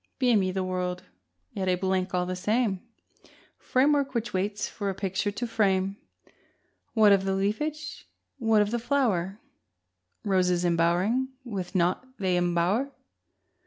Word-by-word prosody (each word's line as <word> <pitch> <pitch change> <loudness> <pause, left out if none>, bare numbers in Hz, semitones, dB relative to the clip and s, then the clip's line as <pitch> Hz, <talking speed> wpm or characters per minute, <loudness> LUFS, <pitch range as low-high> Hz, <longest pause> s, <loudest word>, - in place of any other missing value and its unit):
Beamy 225 -8 +3
the 190 0 -1
world, 180 -1 -2 0.5
yet 190 -1 -3
a 180 - +3
blank 185 0 -1
all 180 -1 0
the 185 +1 -3
same, 210 0 0 0.8
Framework 275 0 +2
which 225 -2 -2
waits 200 +2 -1
for 200 -2 -4
a 190 - -3
picture 195 +1 -1
to 205 +4 -3
frame: 195 -4 +1 1.0
What 215 -2 +6
of 195 -1 +4
the 195 0 0
leafage, 295 +11 -2 0.3
what 225 -3 +4
of 205 - -4
the 240 - 0
flower? 220 -7 0 0.9
Roses 180 -3 +2
embowering 175 +9 +2 0.2
with 195 -5 -5
naught 180 +5 +2
they 185 -2 +1
embower! 175 +9 +1
195 Hz, 135 wpm, -27 LUFS, 185-225 Hz, 1.0 s, What